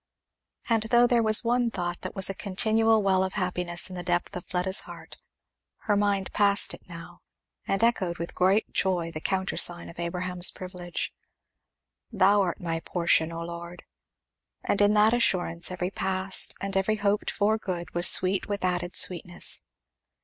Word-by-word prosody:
And 230 -2 +1
though 240 +1 +5
there 240 -1 +2
was 215 +1 +2
one 240 0 +1
thought 175 -4 -5
that - - -7
was 195 - +2
a 195 - 0
continual 220 +3 +1
well 190 -1 +2
of 190 - -3
happiness 180 -2 0
in 185 - -9
the 180 - -5
depth 175 0 -2
of 180 - -6
Fleda's 185 +1 +1
heart, - - -12 0.6
her 205 - 0
mind 200 -1 -1
passed 200 -1 +3
it - - -14
now, 170 0 -11 0.5
and 195 +3 -1
echoed 190 -7 0
with 170 +1 -6
great 190 +4 +1
joy 175 -3 -1
the 155 -1 -7
countersign 190 -2 0
of 170 - -13
Abraham's 180 +1 +1
privilege, 180 -1 -6 1.0
"Thou 200 -1 +3
art 180 -3 -2
my 165 -2 -3
portion, 170 -1 0
O 165 0 -6
Lord!" 170 +1 -9 0.8
And 205 - -1
in 205 +1 +3
that 215 +2 +4
assurance 180 -7 +1
every 180 0 -4
past 190 0 +1
and 195 +1 -5
every 195 +3 +1
hoped 205 0 -1
for 215 +1 0
good 175 -5 -6
was 175 0 +4
sweet 185 +1 +4
with 200 -2 -2
added 180 0 -2
sweetness. 175 -1 +2
185 Hz, 165 wpm, -26 LUFS, 175-205 Hz, 1.0 s, though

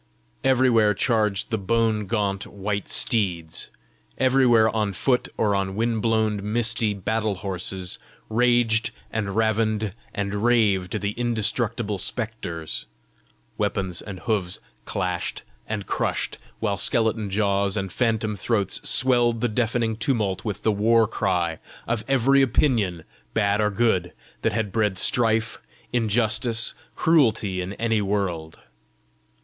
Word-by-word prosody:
Everywhere 120 -5 +4
charged 110 -3 0
the 110 - 0
bone 110 +1 +1
gaunt 100 -2 -1
white 100 0 -4
steeds; 90 -9 0 0.5
everywhere 130 -4 +4
on 105 -3 0
foot 125 +7 0
or 105 -2 +2
on 95 -1 -1
wind 115 0 0
blown 110 -2 +1
misty 115 -2 +2
battle 110 +2 -1
horses, 95 -1 -4 0.3
raged 120 -1 +2 0.2
and 105 -3 -2
ravened 110 -2 +1 0.2
and 100 +1 -3
raved 105 -5 +2
the 100 0 -1
indestructible 115 -2 -1
spectres; 95 -7 -2 0.7
weapons 95 -3 -1
and 95 -4 -8
hoofs 90 -2 -1 0.3
clashed 90 -2 -2 0.2
and 105 -2 -3
crushed; - - -2 0.2
while 105 -3 -1
skeleton 110 0 +2
jaws 100 0 +1
and 95 -2 -3
phantom 110 -2 0
throats 100 0 -1
swelled 120 -2 +3
the 120 - +1
deafening 115 0 0
tumult 110 -5 -1
with 105 -5 -4
the 110 - +3
war 110 +2 +3
cry 90 -7 -1 0.3
of 115 -2 -1
every 135 +1 +4
opinion, 110 - +1 0.3
bad 105 -1 +2
or 105 - +2
good, 100 -5 +1 0.3
that 115 - +1
had 105 -2 -2
bred 105 -3 0
strife, 110 +1 +1 0.3
injustice, 115 0 +1 0.2
cruelty 110 - +2
in 90 +2 -5
any 115 0 0
world. 95 -6 -2
110 Hz, 120 wpm, -24 LUFS, 100-115 Hz, 0.7 s, Everywhere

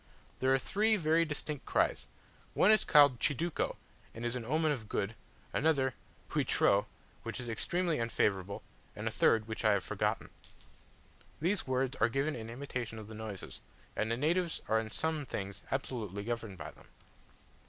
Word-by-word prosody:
There 130 +1 +3
are 135 - +6
three 215 +10 +2
very 165 -1 +3
distinct 150 -1 -5
cries: - - +1 0.5
One 210 - +6
is 215 - +5
called 145 -5 +6
"chiduco," 155 +5 0 0.4
and 115 +1 -5
is 120 +1 -1
an 125 - -3
omen 155 +4 +2
of 115 -7 -4
good; 100 +3 -1 0.4
another, 135 -4 +2 0.4
"huitreu," 100 0 +3 0.3
which - - -5
is 125 - -5
extremely 170 +8 +1
unfavourable; 100 -4 0 0.3
and - - -4
a - - +1
third, 110 -1 +3
which 110 +1 -4
I 110 -1 +5
have 100 -2 +1
forgotten. - - -1 1.1
These 175 +4 0
words 130 0 0
are 115 - +3
given 135 +5 0
in 115 -1 -6
imitation 120 -2 -4
of 110 -1 -8
the - - -8
noises; 110 -3 -7 0.3
and 110 - 0
the 115 - 0
natives 170 +5 +1
are 110 - +3
in 110 -1 -4
some 160 +5 -1
things 100 -6 -5
absolutely 110 -7 -3
governed 115 -3 -4
by - - -7
them. - - -19
125 Hz, 165 wpm, -33 LUFS, 110-155 Hz, 1.1 s, are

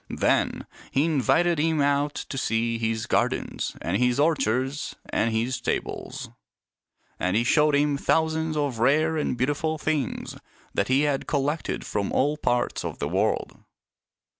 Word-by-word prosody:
Then - - +1 0.2
he 140 +3 +2
invited 165 +3 +2
him 160 0 +1
out 145 +1 +1
to - - -5
see 115 0 0
his 110 0 -1
gardens - - -1
and 85 +4 0
his 125 +2 +2
orchards 135 -2 0
and 115 - +1
his 115 +3 0
stables; - - -4 0.9
and 90 +2 0
he 115 - +3
showed 150 +4 +3
him 145 0 +2
thousands 160 +1 +1
of 140 -6 -1
rare 155 +6 +3
and 150 -5 -1
beautiful 145 +5 0
things 150 -6 -2 0.4
that 100 - 0
he 130 +2 +3
had 145 -2 0
collected 145 +2 -1
from 100 -1 -2
all 145 +3 +2
parts 120 -5 0
of - - -4
the - - -2
world. - - -1
140 Hz, 145 wpm, -25 LUFS, 120-150 Hz, 0.9 s, he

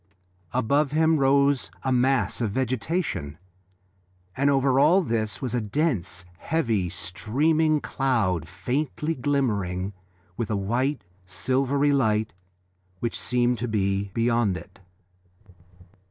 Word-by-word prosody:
Above 140 +4 +1
him 160 +1 +3
rose 140 0 +3
a 130 - 0
mass 125 -4 +1
of 115 - +1
vegetation, 125 - -2 1.0
and 140 +1 +2
over 135 -1 +3
all 170 +7 +5
this 110 -5 -2
was 125 - -2
a 120 - 0
dense, 105 - -1
heavy, 115 - 0
streaming 150 - +1
cloud 110 - 0
faintly 150 - -2
glimmering 105 - -1 0.4
with 115 -4 -2
a 110 - 0
white, 125 +8 -1 0.2
silvery 135 +7 +1
light 110 -5 +1 0.7
which 120 - -2
seemed 125 -1 +1
to 120 - -2
be 100 -2 0
beyond 115 -4 +1
it. - - -13
125 Hz, 110 wpm, -25 LUFS, 105-140 Hz, 1.0 s, all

